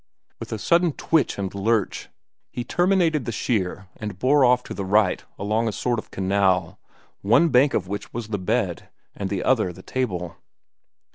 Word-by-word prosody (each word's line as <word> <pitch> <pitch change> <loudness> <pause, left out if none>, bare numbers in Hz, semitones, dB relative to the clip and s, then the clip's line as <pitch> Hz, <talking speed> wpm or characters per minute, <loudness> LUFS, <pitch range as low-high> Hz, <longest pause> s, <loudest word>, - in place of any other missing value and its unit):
With - - -8
a 110 - -2
sudden 170 - +2
twitch 160 +1 +1
and 95 -2 -3
lurch, 105 +1 -1 0.4
he 120 - -5
terminated 175 -4 +1
the - - -2
sheer 95 -4 -2
and 105 -4 -6
bore 135 +6 +3
off 125 0 +4
to - - -7
the 100 - -4
right 100 0 +2
along 110 +3 0
a - - 0
sort 120 +2 -1
of - - -10
canal, 95 -1 0 0.4
one 120 +12 +4
bank 135 +1 +4
of - - -1
which 100 +1 -5
was 115 -2 -6
the 100 -2 -2
bed, 95 -2 -1 0.3
the 100 -1 -3
other 110 -8 +2
the 95 +2 -13
table. 90 -10 -3
110 Hz, 170 wpm, -23 LUFS, 95-125 Hz, 0.4 s, off